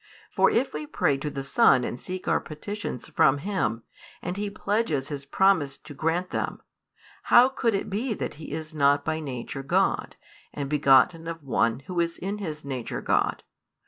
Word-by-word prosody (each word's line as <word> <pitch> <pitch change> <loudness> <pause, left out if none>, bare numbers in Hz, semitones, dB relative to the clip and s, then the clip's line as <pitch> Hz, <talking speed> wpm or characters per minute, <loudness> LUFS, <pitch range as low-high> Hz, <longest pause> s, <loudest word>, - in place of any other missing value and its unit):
For - - +4
if 255 +4 +1
we 150 0 -5
pray 140 - +1
to 150 +2 -4
the 135 -1 -5
Son 130 -2 +4
and 120 - -4
seek 185 0 -6
our - - +3
petitions 175 - -6
from 135 +1 +4
Him, 140 - -2 0.4
and 180 +1 -3
He 205 +1 -2
pledges 200 -9 -1
His 140 -2 -5
promise 160 -7 +2
to 150 -1 -12
grant 165 +5 -1
them; - - -2 0.7
how 245 +2 +7
could 235 -5 0
it 195 - -2
be 220 +4 -2
that - - -4
He - - -8
is 160 0 -5
not 145 -1 +3
by 155 - -1
nature 135 -2 -5
God, 135 - 0 0.4
and 140 -1 -3
begotten 150 +3 +4
of 165 -2 -6
One 115 -2 +1
Who 175 +4 -4
is 170 0 0
in 200 +3 -4
His 155 -7 -5
nature 130 -4 -4
God? - - +1
155 Hz, 180 wpm, -26 LUFS, 140-190 Hz, 0.7 s, how